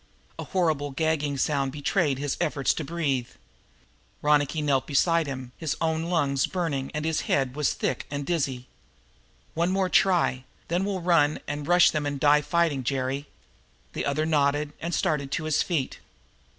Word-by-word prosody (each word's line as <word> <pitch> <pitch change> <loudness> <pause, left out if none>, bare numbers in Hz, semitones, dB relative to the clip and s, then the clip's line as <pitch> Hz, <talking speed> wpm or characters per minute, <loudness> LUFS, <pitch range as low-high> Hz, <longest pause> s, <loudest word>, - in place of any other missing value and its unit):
A - - -4
horrible 160 -6 0
gagging 150 -1 -1
sound 140 -1 0
betrayed 145 0 0
his 145 0 -2
efforts 145 -3 +1
for 160 - -4
breath. 140 -6 -2 0.9
Ronicky 150 +1 +2
knelt 140 -3 +1
beside 165 +2 +2
him. 130 -2 -6
His 160 -4 -3
own 160 0 0
lungs 145 -6 +1
were - - -19
burning, 155 -7 -1
and 150 +1 -2
his 160 -1 0
head 135 -2 +1
was 150 -2 +1
thick - - -2
and 145 0 -4
dizzy. 135 -7 -1 0.9
"One 170 +2 +1
more 190 0 +1
try, 175 -10 +3 0.3
then 175 +3 0
we'll 195 -3 -3
turn 160 -4 +3
and 145 0 -4
rush 175 0 +6
them 150 -2 -1
and 140 -1 -3
die 150 +1 +5
fighting, 150 -3 +1
Jerry." 135 +2 -2 0.7
The - - -2
other 145 +2 0
nodded 145 -1 +1
and 170 - -3
started 140 -3 0
to 165 - -1
his 155 -1 +1
feet. 155 -8 -2
150 Hz, 165 wpm, -26 LUFS, 140-165 Hz, 0.9 s, rush